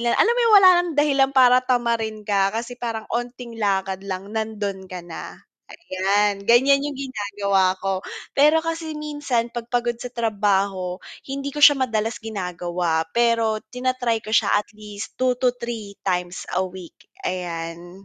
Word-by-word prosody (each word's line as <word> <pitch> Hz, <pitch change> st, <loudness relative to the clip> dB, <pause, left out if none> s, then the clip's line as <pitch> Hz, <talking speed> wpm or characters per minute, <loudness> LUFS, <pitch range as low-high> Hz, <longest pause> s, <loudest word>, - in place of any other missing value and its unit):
lang 235 Hz, 0 st, +1 dB
alam 465 Hz, -, +4 dB
mo -, -, 0 dB
yung 460 Hz, -2 st, +5 dB
wala 375 Hz, -2 st, +9 dB
nang 355 Hz, -1 st, -3 dB
dahilan 280 Hz, -2 st, +3 dB
para 255 Hz, -1 st, +6 dB
tamarin 230 Hz, -4 st, -1 dB
ka 200 Hz, -2 st, +2 dB
kasi 240 Hz, +2 st, -5 dB
parang 225 Hz, -2 st, -3 dB
'onting 240 Hz, 0 st, -5 dB
lakad 195 Hz, -2 st, 0 dB
lang 195 Hz, +2 st, -5 dB
nando'n 205 Hz, -4 st, -4 dB
ka 180 Hz, -2 st, -7 dB
na, 170 Hz, -1 st, -8 dB, 0.3 s
ayan. 200 Hz, -, 0 dB
Ganyan 270 Hz, +4 st, +5 dB
yung 290 Hz, -2 st, -5 dB
ginagawa 200 Hz, -7 st, 0 dB
ko. 195 Hz, -1 st, -1 dB, 0.3 s
Pero 300 Hz, +3 st, +4 dB
kasi 325 Hz, -1 st, -4 dB
minsan 290 Hz, -6 st, -2 dB
'pag 235 Hz, -1 st, -6 dB
pagod 240 Hz, -1 st, -1 dB
sa 250 Hz, -, -5 dB
trabaho 200 Hz, -5 st, 0 dB, 0.3 s
hindi 275 Hz, +1 st, -4 dB
ko 295 Hz, -, -5 dB
siya 290 Hz, -1 st, +8 dB
madalas 225 Hz, -3 st, -1 dB
ginagawa, 175 Hz, -5 st, -2 dB
pero 230 Hz, -2 st, +2 dB
tina-try 250 Hz, -2 st, -1 dB
ko 215 Hz, -, -6 dB
siya 220 Hz, -2 st, +3 dB
at 210 Hz, -, -1 dB
least 210 Hz, -1 st, -9 dB
2-3 245 Hz, -4 st, -1 dB
times 180 Hz, -1 st, -2 dB
a 185 Hz, -, +2 dB
week, 185 Hz, -2 st, -10 dB, 0.3 s
ayan. 175 Hz, 0 st, -5 dB
225 Hz, 155 wpm, -22 LUFS, 195-250 Hz, 0.3 s, wala